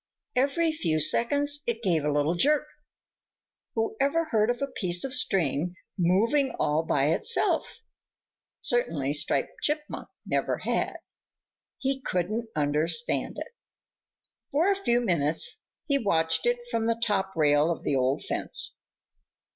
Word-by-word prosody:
Every 300 +5 +2
few 165 - -1
seconds 285 - +3
it 235 0 -2
gave 170 -7 +1
a 150 - 0
little 145 +3 +1
jerk. 295 +11 +2 1.1
Whoever 275 +9 0
heard 220 -7 +1
of 245 - 0
a 275 - 0
piece 180 -10 0
of 270 - -4
string 175 - +1 0.2
moving 225 - +2
all 150 +2 +1
by 145 -2 +1
itself? 465 - +1 0.8
Certainly 160 - 0
Striped 150 +1 0
Chipmunk 300 0 -2 0.2
never - - 0
had. - - -2 0.8
He 270 0 -1
couldn't 215 +4 -2
understand 155 +9 +1
it. - - -7 1.0
For 330 +8 +2
a - - +2
few 245 -12 +1
minutes 180 - +1 0.2
he 280 -2 +1
watched 165 -4 +1
it 240 0 -1
from 230 -1 0
the 230 0 0
top 205 -4 -1
rail 150 0 +3
of 170 - -3
the 140 - 0
old 130 +1 0
fence. - - -1
220 Hz, 130 wpm, -27 LUFS, 160-270 Hz, 1.1 s, seconds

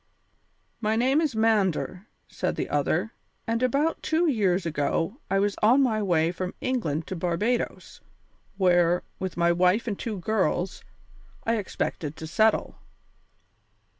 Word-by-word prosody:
"My 220 -1 0
name 260 +6 +3
is 300 -7 -1
Mander," 205 -3 +1 0.2
said - - -3
the - - -3
other, - - 0 0.3
"and 230 0 -1
about 280 +6 +1
two 325 +2 +1
years 195 - +1
ago 165 - -1
I 195 - +2
was 200 +1 +1
on 245 +6 +5
my 220 -4 +1
way 170 -4 +2
from 180 +1 -5
England 165 - -1
to 190 - -5
Barbadoes, 180 +8 -2 0.6
where, 175 -2 +3 0.2
with 190 -2 -4
my 170 0 +3
wife 180 +7 +2
and 205 -4 -3
two 220 -3 -4
girls, 185 -2 -1 0.6
I 230 0 +1
expected 160 -6 -3
to 160 - -7
settle. 215 +7 +1
200 Hz, 135 wpm, -26 LUFS, 175-230 Hz, 0.6 s, on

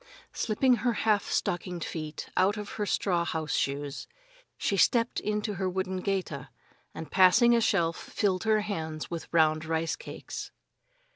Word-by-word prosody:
Slipping 245 +3 +2
her 235 +2 +1
half 210 -2 +2
stockinged 175 -1 -1
feet 155 -2 -5
out 195 +3 +3
of 210 -1 -5
her 210 -1 -3
straw 175 -4 +1
house 160 -3 -2
shoes, 140 0 -2 0.5
she 200 - 0
stepped 230 +4 +3
into 210 0 -2
her 190 - +1
wooden 190 0 -2
geta, 185 -7 -3 0.4
and 160 - -8
passing 210 +6 +6
a 230 - +3
shelf, 170 -7 +2
filled 190 -3 -1
her 215 -1 +3
hands 160 -7 -4
with 170 -1 -6
round 155 -1 +3
rice 160 0 -1
cakes. - - -7
185 Hz, 150 wpm, -29 LUFS, 160-210 Hz, 0.5 s, passing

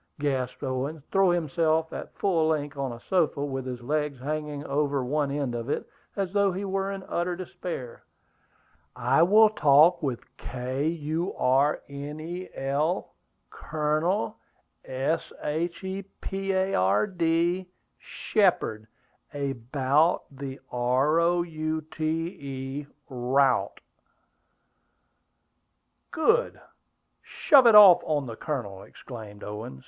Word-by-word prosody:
gasped 130 -4 -2
Owen, 135 +3 -3
throwing 195 -3 +4
himself 160 0 0
at - - -8
full 170 -5 +2
length 150 -2 -1
on 135 -2 -2
a 120 - -8
sofa, 155 -6 +1
with 135 -2 -4
his 125 -1 -5
legs 150 +1 -2
hanging 150 +1 -4
over 140 -1 0
one 145 +2 0
end 140 -3 -2
of 120 +2 -4
it, - - -2 0.3
as 195 -2 -1
though 200 -1 +3
he 190 +3 -4
were 195 0 -1
in 195 -1 -6
utter 175 +1 -1
despair. 170 -8 -7 0.9
"I - - +2
will 215 +5 +6
talk 160 -1 +5
with 130 -5 -2 0.2
K 130 +3 -3
u 165 +2 -2
r 135 +4 +2
n 145 +2 -7
e 175 +4 -6
l, 145 +6 -1 0.4
Colonel, 155 - -1 0.5
S 135 +5 -2
h 165 +5 -2
e 190 +1 -4 0.2
p 195 0 -3
a 190 0 0
r 95 - +3
d, 175 -1 0 0.3
Shepard, 165 - 0 0.5
a 140 -1 -1
bout 135 +6 +1
the 135 0 -7
r 130 +6 +2
o 175 +1 +2
u 155 -1 -3
t 155 0 -6 0.2
e, 140 -3 -6 0.2
route." 130 0 +1 2.3
"Good! 485 +10 +1 0.6
Shove 275 -7 +4
it 225 - +7
off 200 -4 +10
on 145 -3 -1
the 115 -3 -6
Colonel!" 110 -9 -4
exclaimed 110 -4 -11
Owen. 105 -10 -7
150 Hz, 125 wpm, -27 LUFS, 135-175 Hz, 2.3 s, off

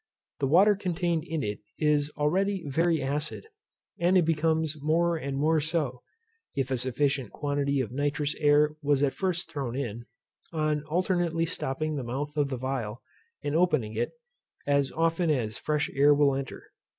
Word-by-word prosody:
The 135 - +1
water 195 +8 +6
contained 170 -4 -1
in 160 -3 -2
it 105 0 -3 0.2
is 150 -1 +2
already 190 +5 +1
very 160 +1 +1
acid, 145 - -2 0.5
and 180 +2 +4
it 175 - +4
becomes 160 -1 0
more 170 +3 +2
and 140 -3 -3
more 155 +2 +2
so 145 -6 -2 0.5
(if 135 -2 -1
a 130 - 0
sufficient 130 0 0
quantity 140 -1 0
of 115 -4 -4
nitrous 145 +2 -1
air 150 0 +4
was 145 -1 +2
at 140 - +2
first 175 -3 -2
thrown 135 -6 -3
in) 120 -4 -4 0.5
on 155 -2 0
alternately 170 0 0
stopping 155 -2 -2
the 135 - -3
mouth 140 +5 -4
of 145 -2 +1
the 130 - -3
phial, 125 -3 -4 0.4
and 145 +1 -1
opening 155 -11 +2
it, - - -1 0.5
as 140 -1 +2
often 165 +1 +1
as 115 -8 0
fresh 150 -1 0
air 145 +1 +5
will 145 -1 +4
enter. 135 -1 -5
150 Hz, 165 wpm, -28 LUFS, 135-165 Hz, 0.5 s, water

